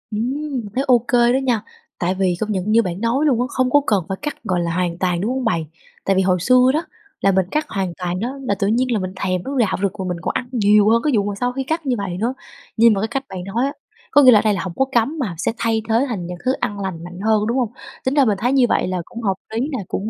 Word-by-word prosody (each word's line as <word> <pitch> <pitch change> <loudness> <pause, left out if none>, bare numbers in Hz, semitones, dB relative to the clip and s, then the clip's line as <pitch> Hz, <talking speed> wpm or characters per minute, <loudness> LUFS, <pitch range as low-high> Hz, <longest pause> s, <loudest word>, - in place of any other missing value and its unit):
Ừm, 260 +2 -2
thấy 270 - +1
ô 245 -2 +6
kê 240 0 +4
đó - - +3
nha. 240 -5 +1 0.4
Tại 180 +2 0
vì 185 -2 +1
công 215 0 -2
nhận 200 +1 -1
như 230 - +5
bạn 180 -2 -4
nói 240 +6 +1
luôn 255 -6 +3
á, 250 - +1
không 255 -1 0
có 290 - +5
cần 200 -5 +2
phải 190 - -2
cắt 295 -1 -5
gọi 180 -2 0
là 170 0 -1
hoàn 175 -1 -1
toàn, 180 -1 0
đúng 220 - -1
hông 260 -1 -2
bạn? 165 -7 +1 0.4
Tại 195 - +2
vì 190 - +3
hồi 185 -1 +2
xưa 255 +7 +5
đó 320 +3 -1 0.4
là 195 - +4
mình 190 -1 +2
cắt 305 0 0
hoàn 190 -4 -2
toàn 180 0 -3
đó 250 +6 -3
là 205 -6 0
tự 195 - +1
nhiên 245 +4 +1
là 220 - +1
mình 185 0 -4
thèm 185 -1 -2
nó 275 0 -4
rạo 210 -5 +2
rực 200 0 -1
mà 190 - -2
mình 180 - -2
còn - - -1
ăn 245 - -3
nhiều 210 -3 +4
hơn 230 +1 +4
cái 300 - +2
vụ 205 - +2
mà 205 0 -2
sau 245 0 0
khi 270 +1 -2
cắt 315 +3 -3
như 255 -2 +1
vậy 185 -3 -4
nữa. 235 +6 -1 0.4
Nhưng 230 0 +6
mà 195 - -1
cái 220 - 0
cách 270 +4 -3
bạn 185 -1 -6
nói 215 +7 -1
á, 280 - -2 0.4
có 290 - +6
nghĩa 255 - +9
là 215 - +7
ở - - +1
đây 215 -1 +3
là 195 - -2
hổng 185 -3 -5
có 270 - +2
cấm 265 +6 +1
mà 205 -11 -2
sẽ 180 - 0
thay 225 -1 0
thế 230 +4 +3
thành 185 -7 -4
những 180 0 -6
thứ 255 - +3
ăn 205 0 -2
lành 185 -4 -4
mạnh 175 +1 -9
hơn, 215 +1 +2
đúng 240 +3 0
hông? 240 -3 0 0.3
Tính 260 - +1
ra 285 -2 +4
mình 210 -4 +1
thấy 245 +6 0
như 265 -2 +5
vậy - - +1
là 185 -1 -2
cũng 235 - -8
hợp 195 -3 0 0.2
lý 225 - -1
nè, 260 -7 -3
cũng 210 +3 -3
220 Hz, 310 wpm, -20 LUFS, 190-255 Hz, 0.4 s, nghĩa